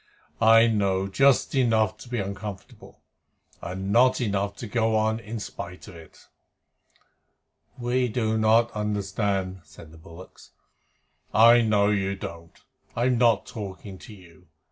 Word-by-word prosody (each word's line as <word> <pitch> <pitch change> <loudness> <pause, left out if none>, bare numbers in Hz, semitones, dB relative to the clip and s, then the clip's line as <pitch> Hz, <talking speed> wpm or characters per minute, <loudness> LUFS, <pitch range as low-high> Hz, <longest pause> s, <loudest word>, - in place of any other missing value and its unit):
I 115 0 +6
know 100 -4 0
just 135 +7 +2
enough 115 -6 +1
to 125 - -13
be 120 - -3
uncomfortable, 100 -1 -8 0.6
and 95 +3 -5
not 125 +3 +4
enough 100 -3 -2
to 115 - -8
go 110 +1 0
on 110 +1 0
in 115 0 -7
spite 90 -2 -9
of 95 - -12
it." 80 -1 -16 1.5
"We 125 +1 0
do 110 -1 -1
not 110 +2 +3
understand," 100 -2 -3
said 80 0 -15
the 80 - -15
bullocks. 85 +3 -15 0.8
"I 115 +2 +7
know 105 -2 +2
you 100 -1 -1
don't. 85 -3 -10 0.4
I'm 120 +1 +1
not 115 -4 +3
talking 100 -2 -9
to 110 - -12
you. 90 -1 -19
105 Hz, 135 wpm, -25 LUFS, 95-115 Hz, 1.5 s, I